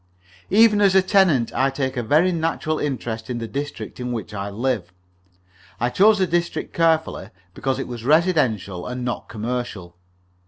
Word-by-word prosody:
Even 210 +1 +5
as 195 -2 +4
a 190 - +6
tenant 170 - +3
I 135 +1 +2
take 135 -1 -3
a 125 - -1
very 155 +10 +3
natural 160 -2 -1
interest 120 -5 -4
in 125 - -2
the 115 -1 -4
district 145 +2 -6
in 125 0 -3
which 110 -2 -5
I 100 0 -4
live. 110 -4 -2 0.9
I 120 - +1
chose 210 +7 +5
the 190 - +2
district 175 0 -2
carefully, 165 -1 +1 0.2
because 135 +5 -2
it - - -4
was 120 -2 -7
residential, 130 - +1
and 125 0 -4
not 120 - -4
commercial. 110 -6 -5
130 Hz, 165 wpm, -22 LUFS, 115-165 Hz, 0.9 s, a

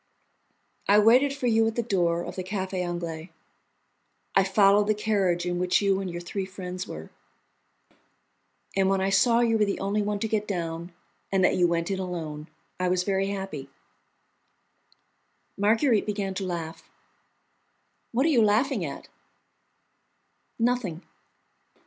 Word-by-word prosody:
"I 205 - +6
waited 245 +7 +5
for 275 -2 -5
you 225 -1 +3
at 225 - -2
the 235 - 0
door 175 -6 +1
of - - -7
the 185 - -4
Café 190 -1 -3
Anglais. 170 -1 -5 1.0
I 195 - +5
followed 200 +1 +4
the 215 - +2
carriage 195 -5 0
in 175 0 -1
which 180 0 +2
you 195 -1 +1
and 190 - -4
your 175 0 -5
three 190 +3 -4
friends 185 -1 -6
were, - - -8 1.6
and 190 -1 +3
when 195 0 +2
I 190 +1 0
saw 230 +4 +4
you 225 -2 +2
were 210 - +4
the 200 - -2
only 200 +2 0
one 205 0 -1
to 220 - -2
get 210 -1 -1
down, 170 -2 -4 0.4
and 190 -1 +2
that - - +3
you 175 -1 +3
went 170 +2 -1
in 190 - -1
alone, 160 -5 -5 0.3
I 185 - +1
was 180 0 +1
very 195 0 0
happy." 190 -9 -5 1.9
Marguerite 220 +3 +2
began 200 -2 -2
to 190 0 -4
laugh. 165 -2 -6 1.2
"What 255 +4 +1
are - - +3
you 255 -7 +4
laughing 215 +1 +2
at?" 140 -4 -6 1.5
"Nothing." 230 -8 -1
195 Hz, 150 wpm, -26 LUFS, 180-215 Hz, 1.9 s, I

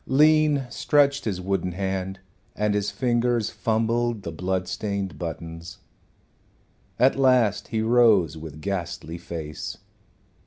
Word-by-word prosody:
Lean 150 0 +4
stretched 145 +2 +2
his 100 -5 -2
wooden 90 -1 -1
hand, 95 0 -3 0.4
and 105 0 +1
his 105 0 0
fingers 120 -2 0
fumbled 115 -1 0
the 85 - -4
blood 90 +3 -2
stained 100 -3 -3
buttons. 85 +1 -6 1.2
At 130 +2 +4
last 125 -6 +3
he 110 0 -1
rose 110 - +4
with 80 -1 -9
ghastly 85 -3 -4
face. 80 -3 -6
100 Hz, 115 wpm, -25 LUFS, 90-120 Hz, 1.2 s, Lean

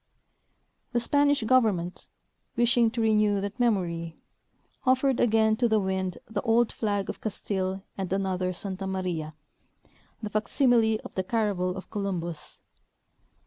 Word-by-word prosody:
" - - -46
The 240 - +3
Spanish 285 +1 +2
government, 215 -8 +1 0.5
wishing 240 -1 +3
to 235 0 -3
renew 210 -2 +3
that 200 +4 -5
memory, 170 -8 0 0.7
offered 260 0 +2
again 220 -1 +3
to 240 0 +2
the 220 -1 +3
wind 190 -2 -2
the 210 -2 -3
old 230 +1 +3
flag 205 -3 -1
of - - -6
Castile 190 -2 -3 0.2
and 190 -2 -3
another 190 -1 0
Santa 190 +1 -5
Maria, 175 -5 -3 0.8
the 210 -2 -6
fac 215 -1 -1
simile 230 -4 +3
of - - -9
the 190 - -1
caravel 195 -4 0
of 190 - -9
Columbus. 175 -6 -4
205 Hz, 140 wpm, -27 LUFS, 185-230 Hz, 0.8 s, The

